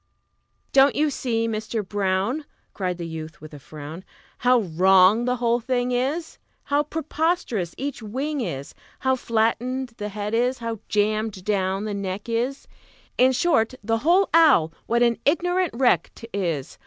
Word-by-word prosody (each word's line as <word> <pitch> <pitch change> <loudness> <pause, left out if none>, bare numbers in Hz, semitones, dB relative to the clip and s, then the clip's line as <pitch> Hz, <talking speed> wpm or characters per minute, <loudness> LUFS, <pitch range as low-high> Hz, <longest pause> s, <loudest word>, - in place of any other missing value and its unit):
"Don't 275 +1 +5
you 300 0 +2
see, 230 -4 -1
Mister 220 0 -3
Brown," 200 +8 -1 0.3
Cried 180 -3 -2
the 170 - -5
youth, 160 +2 -7
with 155 -3 -12
a 145 - -9
frown, 155 +5 -9 0.4
"How 250 -1 +4
wrong 190 +5 +4
the 250 0 +1
whole 240 -1 +1
thing 245 +1 -1
is, 275 +7 -2 0.2
How 285 +1 +1
preposterous 300 - -2
each 275 -3 -4
wing 270 +7 -3
is, 140 - -5 0.3
How 260 0 +2
flattened 245 +2 0
the 210 -2 -4
head 210 +1 -4
is, 245 +3 +1
how 230 -2 -4
jammed 210 -2 0
down 195 -1 0
the 210 - -3
neck 200 +1 -4
is 240 +4 -2 0.5
In 255 +1 +6
short, 255 -3 +2
the 225 +1 0
whole 350 +9 +4
owl, 280 - +5
what 235 +1 +2
an 235 -1 +2
ignorant 355 +1 +1
wreck 240 - +3
't 230 - -10
is! 170 -8 -3
230 Hz, 155 wpm, -24 LUFS, 195-260 Hz, 0.5 s, In